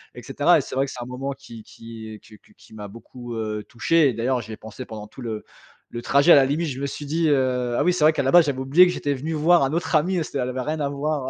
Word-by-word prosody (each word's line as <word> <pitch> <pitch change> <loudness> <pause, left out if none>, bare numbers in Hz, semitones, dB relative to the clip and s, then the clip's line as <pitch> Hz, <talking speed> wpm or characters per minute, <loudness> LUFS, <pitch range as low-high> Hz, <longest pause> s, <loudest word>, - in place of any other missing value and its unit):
et - - -10
cetera - - +3
et - - -1
c'est - - -8
vrai 135 +1 +1
que - - -8
c'est 120 - -7
un - - -9
moment 135 +2 -5
qui 115 -5 -12
qui, 115 -1 -11
heu, - - -14
que 110 - -17
que - - -25
qui - - -19
m'a 105 -1 -8
beaucoup, 120 +3 -10
heu, 110 -1 -3
touché 145 +4 +2
et - - -2
d'ailleurs, 125 +3 -1
j'y 110 - -9
ai - - -9
pensé 110 +4 -10
pendant 105 -1 -9
tout 120 - -16
le 110 -3 -5 0.5
le 120 - -6
trajet. 140 +7 +3
À - - +10
la 135 -2 +5
limite, 155 +3 -1
je 135 +1 -6
me 140 - -1
suis 145 +2 -7
dit 160 +3 0
heu: 125 -3 0
«Ah - - +2
oui, 180 - +2
c'est 165 -4 -1
vrai 155 +1 +6
qu'à 140 - -1
la 135 - +1
base, 175 -3 +7
j'avais 140 -3 -2
oublié 145 +8 +5
que 180 - 0
j'étais 145 -4 -2
venu 150 +5 -4
voir 165 +3 +3
un 135 +3 -1
autre 170 0 -1
ami, 180 +5 +2
heu, - - 0
s 155 - -6
te - - -3
ça 125 - 0
n'avait 130 0 -4
rien 155 +4 -3
à 140 - -1
voir 140 -1 -3
135 Hz, 325 wpm, -23 LUFS, 120-150 Hz, 0.5 s, À